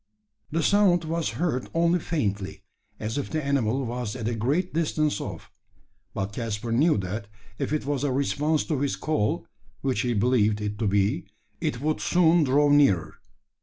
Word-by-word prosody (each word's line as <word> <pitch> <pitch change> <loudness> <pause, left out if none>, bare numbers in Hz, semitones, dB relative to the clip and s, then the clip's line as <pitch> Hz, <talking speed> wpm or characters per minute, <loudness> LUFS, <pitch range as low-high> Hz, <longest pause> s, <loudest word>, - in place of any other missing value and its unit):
The 165 +1 0
sound 190 -3 +4
was 165 0 -1
heard 150 -7 -1
only 170 +1 +3
faintly, 105 - -2 0.4
as 110 +6 -2
if 140 - -4
the 155 -3 -2
animal 135 -2 +1
was 120 -2 -4
at 115 -3 -4
a 120 - 0
great 140 - 0
distance 155 -2 0
off; - - -7 0.6
but 100 +1 -3
Caspar 115 -1 -3
knew 150 +6 +3
that 100 +2 -4 0.3
if - - -2
it 155 -2 -1
was 140 -1 -1
a 145 - +1
response 145 +3 +1
to 150 -4 -2
his 140 0 0
call 105 -9 -1 0.4
which 135 -2 0
he 120 -2 0
believed 110 -1 +2
it 105 0 -4
to 110 - +1
be 100 0 +1 0.3
it 120 - -2
would 155 +1 0
soon 170 -1 +4
draw 145 +2 +3
nearer. 140 - +3
135 Hz, 170 wpm, -26 LUFS, 110-155 Hz, 0.6 s, sound